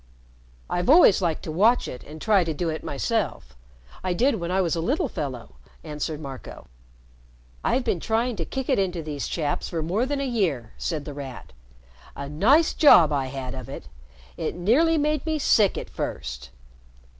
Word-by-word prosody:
"I've 175 Hz, +6 st, -1 dB
always 300 Hz, -, +7 dB
liked 165 Hz, -4 st, -1 dB
to 155 Hz, -, -5 dB
watch 220 Hz, +9 st, +3 dB
it 125 Hz, -, -8 dB
and 155 Hz, +1 st, -11 dB
try 200 Hz, +1 st, +3 dB
to 160 Hz, -2 st, -3 dB
do 170 Hz, +2 st, -1 dB
it 160 Hz, -, -4 dB
myself. 140 Hz, -, -2 dB, 0.5 s
I 185 Hz, -1 st, 0 dB
did 235 Hz, +3 st, +2 dB
when 170 Hz, 0 st, -4 dB
I 185 Hz, +1 st, +1 dB
was 175 Hz, -2 st, +1 dB
a 165 Hz, -, -2 dB
little 275 Hz, -, 0 dB
fellow," 130 Hz, -, -6 dB, 0.3 s
answered 150 Hz, 0 st, -4 dB
Marco. 135 Hz, -4 st, -9 dB, 1.0 s
"I've 260 Hz, -, +1 dB
been 180 Hz, -, 0 dB
trying 230 Hz, +5 st, 0 dB
to 170 Hz, -, -2 dB
kick 265 Hz, +6 st, -4 dB
it 265 Hz, -, +2 dB
into 180 Hz, -4 st, -1 dB
these 150 Hz, -3 st, -4 dB
chaps 150 Hz, -4 st, -2 dB
for 165 Hz, -2 st, -3 dB
more 200 Hz, +10 st, 0 dB
than 285 Hz, 0 st, -2 dB
a 275 Hz, -, -1 dB
year," 165 Hz, -, -1 dB
said 155 Hz, -4 st, -3 dB
The 145 Hz, -, -6 dB
Rat. 135 Hz, -3 st, -9 dB, 0.6 s
"A 140 Hz, -, -6 dB
nice 235 Hz, -, +3 dB
job 170 Hz, -, +7 dB
I 135 Hz, -2 st, 0 dB
had 130 Hz, -1 st, -5 dB
of 130 Hz, -3 st, -8 dB
it! 70 Hz, -, -8 dB, 0.5 s
It -, -, -3 dB
nearly 275 Hz, -, +3 dB
made 300 Hz, -1 st, 0 dB
me 315 Hz, -1 st, -1 dB
sick 215 Hz, -8 st, +3 dB
at -, -, -5 dB
first." 60 Hz, +1 st, -5 dB
175 Hz, 185 wpm, -25 LUFS, 145-235 Hz, 1.0 s, always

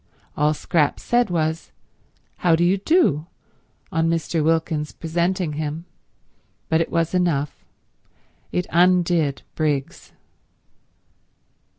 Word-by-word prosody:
All 150 Hz, +1 st, +2 dB
Scrap 150 Hz, -1 st, +1 dB
said 240 Hz, -2 st, +1 dB
was, 160 Hz, -1 st, -2 dB, 0.7 s
"How 170 Hz, -2 st, +3 dB
do 170 Hz, -, +1 dB
you 185 Hz, +3 st, +2 dB
do," 195 Hz, -, +2 dB, 0.6 s
on 165 Hz, 0 st, +1 dB
Mr. 165 Hz, -1 st, 0 dB
Wilkins 160 Hz, -1 st, 0 dB
presenting 170 Hz, 0 st, -1 dB
him, 155 Hz, +2 st, -4 dB, 0.8 s
but 160 Hz, 0 st, +3 dB
it -, -, -1 dB
was 165 Hz, 0 st, 0 dB
enough; 165 Hz, -6 st, 0 dB, 0.9 s
it 180 Hz, -, -1 dB
undid 175 Hz, -4 st, +2 dB
Briggs. 145 Hz, -4 st, -2 dB
165 Hz, 100 wpm, -22 LUFS, 155-175 Hz, 0.9 s, How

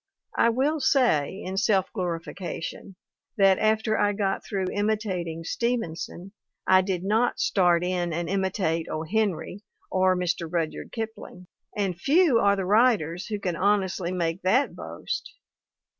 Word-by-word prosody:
I 230 Hz, -, +4 dB
will 275 Hz, +7 st, +1 dB
say, 205 Hz, -, +2 dB
in 190 Hz, +1 st, -5 dB
self 195 Hz, -2 st, +2 dB
glori 175 Hz, -4 st, -2 dB
fication, 180 Hz, +1 st, -7 dB, 0.4 s
that 195 Hz, -2 st, +5 dB
after 220 Hz, 0 st, +1 dB
I 205 Hz, 0 st, +2 dB
got 195 Hz, -1 st, -1 dB
through 190 Hz, -2 st, -2 dB
imitating 200 Hz, -6 st, -2 dB
Steven 235 Hz, -3 st, -1 dB
son, 180 Hz, +3 st, -8 dB, 0.3 s
I 185 Hz, 0 st, +6 dB
did 185 Hz, -2 st, -2 dB
not 220 Hz, +5 st, +1 dB
start 175 Hz, -3 st, +3 dB
in 180 Hz, -1 st, -1 dB
and 170 Hz, +1 st, -2 dB
imitate 185 Hz, -3 st, -1 dB
O. 155 Hz, -, -3 dB
Henry, 200 Hz, +1 st, -1 dB, 0.3 s
or 185 Hz, 0 st, +3 dB
Mr. 175 Hz, -2 st, -2 dB
Rudyard 165 Hz, -3 st, -3 dB
Kipling; 220 Hz, -5 st, -7 dB, 0.3 s
and 195 Hz, -3 st, 0 dB
few 295 Hz, -, +4 dB
are 200 Hz, -2 st, +4 dB
the 195 Hz, -2 st, -2 dB
writers 205 Hz, -5 st, +2 dB
who 210 Hz, -2 st, -3 dB
can 180 Hz, -3 st, -2 dB
honestly 190 Hz, -2 st, +1 dB
make 170 Hz, 0 st, -2 dB
that 250 Hz, +10 st, +2 dB
boast -, -, -6 dB
190 Hz, 145 wpm, -26 LUFS, 175-215 Hz, 0.4 s, I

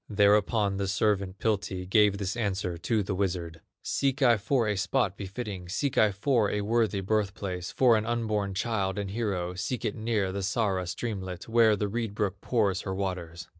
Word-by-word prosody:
Thereupon 105 Hz, 0 st, +3 dB
the 100 Hz, 0 st, -1 dB
servant, 100 Hz, -1 st, 0 dB
Piltti, 95 Hz, -3 st, -1 dB
Gave 105 Hz, 0 st, +4 dB
this 100 Hz, -1 st, -3 dB
answer 95 Hz, -6 st, -1 dB
to 105 Hz, +5 st, 0 dB
the 95 Hz, -, -3 dB
wizard: 85 Hz, -4 st, -2 dB, 0.2 s
"Seek 140 Hz, 0 st, 0 dB
I 120 Hz, -3 st, +6 dB
for 115 Hz, +3 st, +1 dB
a 105 Hz, -, +1 dB
spot 100 Hz, 0 st, 0 dB
befitting, 100 Hz, -2 st, -6 dB
Seek 135 Hz, +8 st, -1 dB
I 110 Hz, -1 st, +4 dB
for 105 Hz, +1 st, +1 dB
a 105 Hz, -, -1 dB
worthy 110 Hz, -1 st, +1 dB
birth 100 Hz, 0 st, 0 dB
place, 90 Hz, -4 st, -4 dB
For 125 Hz, -3 st, +4 dB
an 110 Hz, 0 st, 0 dB
unborn 110 Hz, -4 st, -1 dB
child 100 Hz, -2 st, -1 dB
and 100 Hz, -1 st, -3 dB
hero; 100 Hz, -5 st, -2 dB
Seek 110 Hz, +7 st, -3 dB
it 105 Hz, -, 0 dB
near 110 Hz, -4 st, -1 dB
the 100 Hz, +1 st, -3 dB
Sara 95 Hz, -2 st, 0 dB
streamlet, 95 Hz, -3 st, -5 dB
Where 115 Hz, -2 st, +5 dB
the 105 Hz, 0 st, -1 dB
reed 110 Hz, 0 st, -3 dB
brook 100 Hz, -2 st, -2 dB
pours 100 Hz, -6 st, +1 dB
her 95 Hz, -, -4 dB
waters. 90 Hz, -3 st, -4 dB
100 Hz, 185 wpm, -28 LUFS, 95-110 Hz, 0.2 s, I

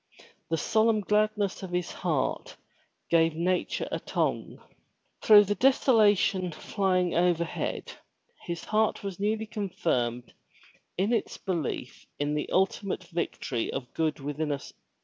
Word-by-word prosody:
The 165 Hz, -, +1 dB
solemn 220 Hz, +3 st, +2 dB
gladness 210 Hz, -1 st, +1 dB
of 190 Hz, -, -6 dB
his 180 Hz, 0 st, -2 dB
heart -, -, -2 dB, 0.5 s
gave 165 Hz, -1 st, +4 dB
nature 180 Hz, +2 st, -1 dB
a -, -, -1 dB
tongue. -, -, -2 dB, 0.6 s
Through 210 Hz, -1 st, +8 dB
the 205 Hz, 0 st, 0 dB
desolation 205 Hz, -6 st, +3 dB
flying 185 Hz, +2 st, 0 dB
over 175 Hz, -1 st, +2 dB
head, 165 Hz, -, -4 dB, 0.6 s
his 170 Hz, -1 st, -4 dB
heart 215 Hz, 0 st, +1 dB
was 195 Hz, -2 st, -5 dB
newly 215 Hz, +2 st, 0 dB
confirmed 125 Hz, -, -2 dB, 0.6 s
in 200 Hz, +6 st, +1 dB
its 230 Hz, -, -1 dB
belief 165 Hz, -8 st, -4 dB
in 145 Hz, +1 st, -1 dB
the 150 Hz, -, -2 dB
ultimate 190 Hz, +1 st, 0 dB
victory 150 Hz, -8 st, -2 dB
of 125 Hz, -3 st, -6 dB
good 155 Hz, -2 st, -1 dB
within 145 Hz, +2 st, -3 dB
us. 140 Hz, -1 st, -5 dB
185 Hz, 130 wpm, -28 LUFS, 160-210 Hz, 0.6 s, Through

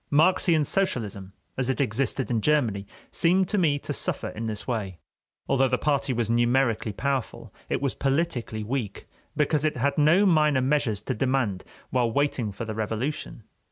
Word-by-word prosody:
Marxian 160 Hz, 0 st, +4 dB
socialism, 105 Hz, -, -1 dB, 0.3 s
as 130 Hz, -1 st, 0 dB
it 130 Hz, -, -1 dB
existed 130 Hz, +1 st, -1 dB
in 115 Hz, -2 st, +1 dB
Germany, 115 Hz, -9 st, +1 dB, 0.2 s
seemed 185 Hz, +2 st, +2 dB
to 210 Hz, -, +1 dB
me 150 Hz, -5 st, +2 dB
to -, -, -5 dB
suffer -, -, -2 dB
in 115 Hz, +1 st, -5 dB
this 110 Hz, -1 st, -5 dB
way: 105 Hz, -8 st, -3 dB, 0.5 s
although 135 Hz, 0 st, +3 dB
the 125 Hz, 0 st, +1 dB
party 140 Hz, -2 st, 0 dB
was 120 Hz, -3 st, 0 dB
numerically 120 Hz, -1 st, +1 dB
powerful, 135 Hz, +3 st, -3 dB, 0.2 s
it -, -, -1 dB
was 140 Hz, -, 0 dB
politically 135 Hz, -6 st, -1 dB
weak, 115 Hz, -2 st, -4 dB, 0.3 s
because 150 Hz, 0 st, +1 dB
it 155 Hz, -3 st, 0 dB
had 140 Hz, +5 st, 0 dB
no 165 Hz, +7 st, +5 dB
minor 155 Hz, -6 st, +4 dB
measures 130 Hz, -6 st, +1 dB
to -, -, -2 dB
demand 120 Hz, -6 st, 0 dB, 0.3 s
while 120 Hz, -2 st, +1 dB
waiting 130 Hz, -4 st, 0 dB
for 115 Hz, +4 st, -6 dB
the 110 Hz, -, -4 dB
revolution. 110 Hz, +3 st, -4 dB
130 Hz, 165 wpm, -26 LUFS, 110-150 Hz, 0.5 s, no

